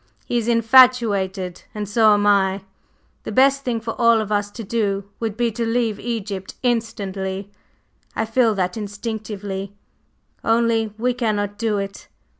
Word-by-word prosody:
He 240 Hz, -, 0 dB
is 230 Hz, -, -4 dB
infatuated, 225 Hz, -6 st, +3 dB
and 210 Hz, -1 st, -3 dB
so 215 Hz, 0 st, +5 dB
am 205 Hz, 0 st, 0 dB
I. 195 Hz, -1 st, +3 dB, 0.6 s
The -, -, -6 dB
best 275 Hz, +1 st, +4 dB
thing 240 Hz, -2 st, -1 dB
for 225 Hz, 0 st, -4 dB
all 230 Hz, -1 st, +5 dB
of 215 Hz, -1 st, -4 dB
us 205 Hz, 0 st, 0 dB
to 225 Hz, +2 st, -8 dB
do 200 Hz, -2 st, -1 dB, 0.2 s
would 220 Hz, -2 st, -3 dB
be 240 Hz, -1 st, +1 dB
to 235 Hz, +2 st, -3 dB
leave 230 Hz, -2 st, 0 dB
Egypt 205 Hz, -5 st, -4 dB
instantly; 200 Hz, -5 st, -2 dB, 0.6 s
I 220 Hz, -, 0 dB
feel 225 Hz, -1 st, +2 dB
that 180 Hz, -2 st, -1 dB
instinctively, 205 Hz, -2 st, -5 dB, 0.7 s
only 225 Hz, -1 st, +2 dB
we 250 Hz, +2 st, +1 dB
cannot 210 Hz, -4 st, -2 dB
do 220 Hz, -2 st, 0 dB
it. 195 Hz, 0 st, -6 dB
215 Hz, 150 wpm, -21 LUFS, 200-230 Hz, 0.7 s, so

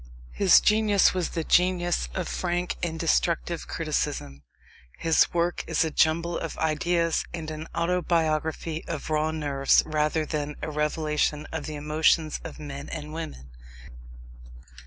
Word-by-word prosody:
His 195 Hz, -3 st, +6 dB
genius 210 Hz, -2 st, +4 dB
was 180 Hz, -2 st, -1 dB
the 165 Hz, -, -3 dB
genius 175 Hz, -, +2 dB
of -, -, -2 dB
frank 175 Hz, 0 st, -2 dB
and 165 Hz, -2 st, -3 dB
destructive -, -, 0 dB
criticism. 70 Hz, 0 st, -3 dB, 0.6 s
His 165 Hz, -1 st, +3 dB
work 175 Hz, 0 st, 0 dB
is 165 Hz, 0 st, +2 dB
a 160 Hz, -, -2 dB
jumble 170 Hz, +3 st, +1 dB
of 165 Hz, -, -5 dB
ideas 165 Hz, +2 st, +1 dB
and 160 Hz, -2 st, -6 dB
an 155 Hz, +1 st, -6 dB
autobiography 165 Hz, -2 st, 0 dB
of 155 Hz, -1 st, -5 dB
raw 155 Hz, 0 st, +1 dB
nerves 145 Hz, -3 st, +2 dB
rather 155 Hz, 0 st, 0 dB
than 150 Hz, -1 st, -3 dB
a 155 Hz, -, -3 dB
revelation 150 Hz, 0 st, 0 dB
of 160 Hz, -2 st, -4 dB
the 155 Hz, -, -5 dB
emotions 155 Hz, +1 st, +1 dB
of -, -, -8 dB
men 140 Hz, -2 st, -7 dB
and 150 Hz, -1 st, -6 dB
women. 65 Hz, -, -7 dB
160 Hz, 135 wpm, -26 LUFS, 150-170 Hz, 0.6 s, His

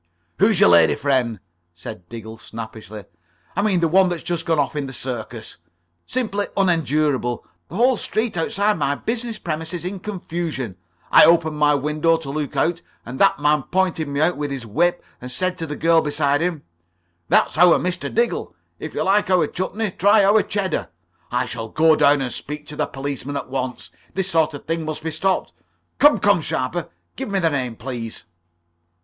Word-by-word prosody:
"Who's 205 Hz, -1 st, +4 dB
your -, -, +7 dB
lady 85 Hz, -2 st, +6 dB
friend?" 125 Hz, -6 st, 0 dB, 0.4 s
said 85 Hz, 0 st, -9 dB
Diggle, 110 Hz, -1 st, -9 dB
snappishly. 110 Hz, -2 st, -9 dB, 0.5 s
"I -, -, +1 dB
mean 195 Hz, -4 st, +2 dB
the 165 Hz, -, +3 dB
one 185 Hz, +3 st, +4 dB
that's 175 Hz, -2 st, -4 dB
just 175 Hz, -1 st, -3 dB
gone 165 Hz, -1 st, +2 dB
off 145 Hz, +1 st, 0 dB
in 145 Hz, -2 st, -2 dB
the 135 Hz, -, -8 dB
circus. 120 Hz, -3 st, -6 dB, 0.5 s
Simply 210 Hz, -5 st, -1 dB
unendurable. 150 Hz, -, +1 dB, 0.2 s
The 165 Hz, -, -10 dB
whole 245 Hz, +3 st, +3 dB
street 220 Hz, +1 st, -2 dB
outside 205 Hz, +3 st, 0 dB
my 140 Hz, 0 st, +1 dB
business 230 Hz, +5 st, -3 dB
premises 160 Hz, +1 st, -4 dB
in 190 Hz, +1 st, -4 dB
confusion. 170 Hz, -, -4 dB, 0.4 s
I -, -, +9 dB
opened 160 Hz, -2 st, +3 dB
my 150 Hz, 0 st, +4 dB
window 150 Hz, +3 st, +1 dB
to 155 Hz, -4 st, -7 dB
look 150 Hz, 0 st, -3 dB
out, 170 Hz, 0 st, +1 dB, 0.2 s
and 125 Hz, +3 st, -7 dB
that -, -, +4 dB
man 150 Hz, 0 st, +3 dB
pointed 180 Hz, -1 st, 0 dB
me 140 Hz, 0 st, -3 dB
out 170 Hz, +1 st, +2 dB
with 145 Hz, 0 st, -2 dB
his 135 Hz, -4 st, -5 dB
whip 175 Hz, +11 st, +1 dB, 0.2 s
and 125 Hz, 0 st, -7 dB
said 185 Hz, +7 st, -1 dB
to 165 Hz, -, -4 dB
the 150 Hz, -, -4 dB
girl 165 Hz, +1 st, +4 dB
beside 145 Hz, -1 st, 0 dB
him: 170 Hz, -4 st, -2 dB, 0.7 s
'That's -, -, +3 dB
our 175 Hz, -1 st, +7 dB
Mr. 180 Hz, 0 st, -3 dB
Diggle. 235 Hz, +1 st, -1 dB, 0.2 s
If -, -, -7 dB
you -, -, 0 dB
like 200 Hz, 0 st, +2 dB
our 185 Hz, -2 st, +4 dB
chutney, 200 Hz, +3 st, -3 dB
try 205 Hz, +3 st, +4 dB
our 210 Hz, +2 st, +5 dB
cheddar.' 200 Hz, -2 st, -2 dB, 0.4 s
I -, -, 0 dB
shall 115 Hz, -1 st, -6 dB
go 160 Hz, +3 st, +4 dB
down 145 Hz, -1 st, +4 dB
and 125 Hz, -2 st, -2 dB
speak 150 Hz, 0 st, -6 dB
to 150 Hz, -, -8 dB
the 150 Hz, -1 st, -1 dB
policeman 140 Hz, +1 st, -5 dB
at 135 Hz, -, -6 dB
once. 130 Hz, -2 st, -4 dB, 0.2 s
This 190 Hz, 0 st, -2 dB
[Pg -, -, -7 dB
37]sort 155 Hz, -, -16 dB
of 145 Hz, -, -10 dB
thing 165 Hz, 0 st, -2 dB
must 155 Hz, 0 st, -5 dB
be 160 Hz, -, -2 dB
stopped. 185 Hz, +5 st, -1 dB, 0.5 s
Come, 295 Hz, +1 st, +6 dB
come, 205 Hz, -4 st, +3 dB
Sharper, 155 Hz, +4 st, -2 dB, 0.3 s
give 265 Hz, -3 st, -5 dB
me 200 Hz, -, 0 dB
the 165 Hz, -4 st, +2 dB
name, 125 Hz, -5 st, -2 dB
please." 115 Hz, -2 st, -6 dB
155 Hz, 190 wpm, -21 LUFS, 135-185 Hz, 0.7 s, I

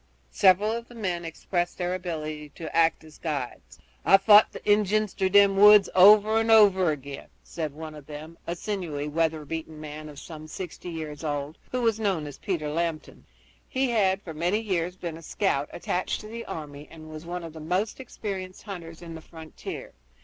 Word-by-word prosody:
Several 190 Hz, -, +4 dB
of 235 Hz, +1 st, -4 dB
the 240 Hz, -, -14 dB
men 180 Hz, -6 st, -2 dB
expressed 175 Hz, +1 st, -3 dB
their 180 Hz, 0 st, -1 dB
ability 155 Hz, -4 st, -5 dB
to 160 Hz, -2 st, -7 dB
act 165 Hz, -1 st, +3 dB
as 155 Hz, -1 st, -15 dB
guides. 145 Hz, -6 st, -5 dB, 0.3 s
"I've 195 Hz, 0 st, +5 dB
fought 210 Hz, 0 st, +8 dB
the -, -, -10 dB
Injuns 210 Hz, 0 st, +2 dB
through 190 Hz, -1 st, 0 dB
them 200 Hz, 0 st, +5 dB
woods 210 Hz, 0 st, +8 dB
over 210 Hz, +3 st, +7 dB
and 225 Hz, 0 st, 0 dB
over 200 Hz, -5 st, +6 dB
again," 140 Hz, -2 st, -5 dB, 0.2 s
said 155 Hz, -3 st, -4 dB
one 155 Hz, +1 st, -8 dB
of 150 Hz, -2 st, -12 dB
them, 155 Hz, +2 st, -9 dB
a 170 Hz, -, -2 dB
sinewy, 175 Hz, -7 st, -4 dB
weather 160 Hz, 0 st, 0 dB
beaten 160 Hz, 0 st, -6 dB
man 155 Hz, 0 st, -8 dB
of 145 Hz, -, -12 dB
some 155 Hz, +1 st, -9 dB
sixty 180 Hz, +2 st, -7 dB
years 155 Hz, -2 st, -6 dB
old, 145 Hz, 0 st, -3 dB
who 250 Hz, -1 st, -1 dB
was 225 Hz, -2 st, +2 dB
known 195 Hz, -8 st, 0 dB
as 145 Hz, -, -9 dB
Peter 170 Hz, -7 st, -2 dB
Lambton. 165 Hz, 0 st, -3 dB, 0.4 s
He 260 Hz, -2 st, 0 dB
had 195 Hz, -3 st, +2 dB
for 165 Hz, -, -7 dB
many 175 Hz, +7 st, 0 dB
years 180 Hz, -5 st, -2 dB
been 170 Hz, -3 st, -6 dB
a -, -, -12 dB
scout 150 Hz, -4 st, -1 dB
attached 180 Hz, +1 st, -2 dB
to 215 Hz, -, -10 dB
the 230 Hz, +2 st, -7 dB
army 145 Hz, -2 st, -7 dB
and 155 Hz, -1 st, -12 dB
was 155 Hz, +2 st, -9 dB
one 175 Hz, 0 st, -4 dB
of 165 Hz, -2 st, -8 dB
the 160 Hz, -, -9 dB
most 180 Hz, +10 st, -1 dB
experienced 195 Hz, -7 st, -6 dB
hunters 170 Hz, -5 st, -8 dB
on 165 Hz, -1 st, -8 dB
the 160 Hz, -, -8 dB
frontier. 160 Hz, -1 st, -9 dB
170 Hz, 195 wpm, -26 LUFS, 155-200 Hz, 0.4 s, fought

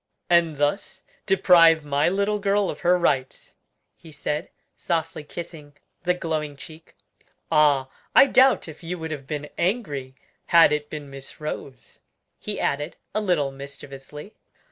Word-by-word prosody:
"And 170 Hz, -3 st, +3 dB
thus 145 Hz, +8 st, -2 dB, 0.2 s
deprive 165 Hz, -5 st, +5 dB
my 145 Hz, +2 st, +2 dB
little 200 Hz, +3 st, 0 dB
girl 200 Hz, 0 st, +1 dB
of 145 Hz, -, -10 dB
her 180 Hz, +1 st, +3 dB
rights," 135 Hz, -7 st, -1 dB, 0.4 s
he 165 Hz, -, -15 dB
said, 150 Hz, 0 st, -4 dB, 0.3 s
softly 165 Hz, -2 st, -3 dB
kissing 150 Hz, -2 st, -9 dB, 0.2 s
the 180 Hz, +1 st, +1 dB
glowing 155 Hz, -4 st, -3 dB
cheek. 160 Hz, +2 st, -13 dB, 0.6 s
"Ah! 145 Hz, -3 st, +4 dB, 0.3 s
I -, -, +9 dB
doubt 265 Hz, -5 st, +4 dB
if 160 Hz, -1 st, -11 dB
you 175 Hz, +1 st, -5 dB
would 160 Hz, -1 st, -6 dB
have 140 Hz, -3 st, -6 dB
been 150 Hz, 0 st, -4 dB
angry 150 Hz, -, -2 dB, 0.3 s
had 165 Hz, -3 st, +6 dB
it 150 Hz, 0 st, -2 dB
been 145 Hz, -2 st, -8 dB
Miss 135 Hz, 0 st, -10 dB
Rose," 140 Hz, -4 st, -7 dB, 0.4 s
he -, -, -5 dB
added, 145 Hz, +3 st, -2 dB, 0.2 s
a 215 Hz, -, 0 dB
little 170 Hz, -9 st, +1 dB
mischievously. 140 Hz, +5 st, -10 dB
155 Hz, 145 wpm, -24 LUFS, 145-175 Hz, 0.6 s, I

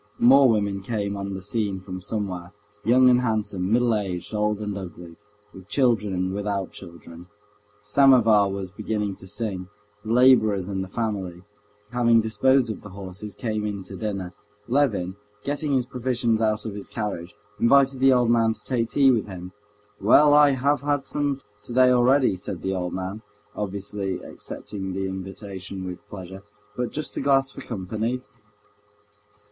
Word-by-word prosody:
More 135 Hz, +2 st, +6 dB
women 100 Hz, -3 st, 0 dB
came 100 Hz, -1 st, -2 dB
on 100 Hz, 0 st, -4 dB
the 95 Hz, -, -6 dB
scene 105 Hz, -1 st, -1 dB
from 95 Hz, 0 st, -8 dB
somewhere, 95 Hz, -3 st, -4 dB, 0.3 s
young 125 Hz, +2 st, +5 dB
and 125 Hz, 0 st, +5 dB
handsome, 105 Hz, -5 st, -1 dB
middle 120 Hz, 0 st, +3 dB
aged, 95 Hz, -3 st, -3 dB
old 105 Hz, 0 st, +1 dB
and 105 Hz, -1 st, -4 dB
ugly, 85 Hz, -3 st, -8 dB, 0.4 s
with 95 Hz, 0 st, -13 dB
children 115 Hz, -5 st, +2 dB
and 95 Hz, 0 st, -1 dB
without 100 Hz, -1 st, -2 dB
children. 85 Hz, -1 st, -12 dB, 0.5 s
The -, -, -23 dB
samovar 115 Hz, -4 st, +5 dB
was 95 Hz, -1 st, -5 dB
beginning 105 Hz, -1 st, -3 dB
to 95 Hz, -, -10 dB
sing; 100 Hz, -2 st, -3 dB, 0.4 s
the 110 Hz, -, -4 dB
laborers 115 Hz, -6 st, +5 dB
and 95 Hz, -1 st, -2 dB
the -, -, -7 dB
family, 95 Hz, -5 st, -4 dB, 0.5 s
having 120 Hz, -2 st, +4 dB
disposed 120 Hz, +3 st, +2 dB
of -, -, -7 dB
the 105 Hz, -, -10 dB
horses, 100 Hz, +1 st, -8 dB
came 110 Hz, -3 st, -2 dB
in 100 Hz, -2 st, -3 dB
to -, -, -9 dB
dinner. 100 Hz, -5 st, -4 dB, 0.3 s
Levin, 110 Hz, -8 st, +1 dB, 0.3 s
getting 145 Hz, +1 st, -2 dB
his 130 Hz, -2 st, +2 dB
provisions 120 Hz, -3 st, -1 dB
out 110 Hz, -1 st, 0 dB
of 110 Hz, -, -4 dB
his 100 Hz, 0 st, -6 dB
carriage, 105 Hz, -4 st, -5 dB, 0.2 s
invited 135 Hz, +2 st, +4 dB
the 135 Hz, 0 st, +5 dB
old 125 Hz, -2 st, +3 dB
man 115 Hz, -1 st, +3 dB
to -, -, -12 dB
take 115 Hz, -3 st, -1 dB
tea 135 Hz, +1 st, +5 dB
with 115 Hz, -4 st, 0 dB
him. 90 Hz, -2 st, -8 dB, 0.5 s
"Well, 145 Hz, +8 st, +6 dB
I 145 Hz, -1 st, +6 dB
have 140 Hz, +1 st, +1 dB
had 145 Hz, -1 st, 0 dB
some 145 Hz, -1 st, -1 dB, 0.2 s
today 125 Hz, +2 st, +3 dB
already," 125 Hz, -2 st, +4 dB
said 90 Hz, 0 st, -6 dB
the 95 Hz, -, -1 dB
old 90 Hz, -1 st, -3 dB
man, 95 Hz, +3 st, -5 dB, 0.3 s
obviously 100 Hz, -1 st, -3 dB
accepting 95 Hz, -2 st, -6 dB
the 95 Hz, +1 st, -2 dB
invitation 95 Hz, 0 st, -7 dB
with 90 Hz, -1 st, -8 dB
pleasure. 95 Hz, -1 st, -9 dB, 0.3 s
"But 125 Hz, -1 st, -2 dB
just 155 Hz, 0 st, -4 dB
a -, -, -1 dB
glass 135 Hz, -1 st, +3 dB
for -, -, -10 dB
company." 110 Hz, +4 st, -3 dB
105 Hz, 165 wpm, -24 LUFS, 95-125 Hz, 0.5 s, More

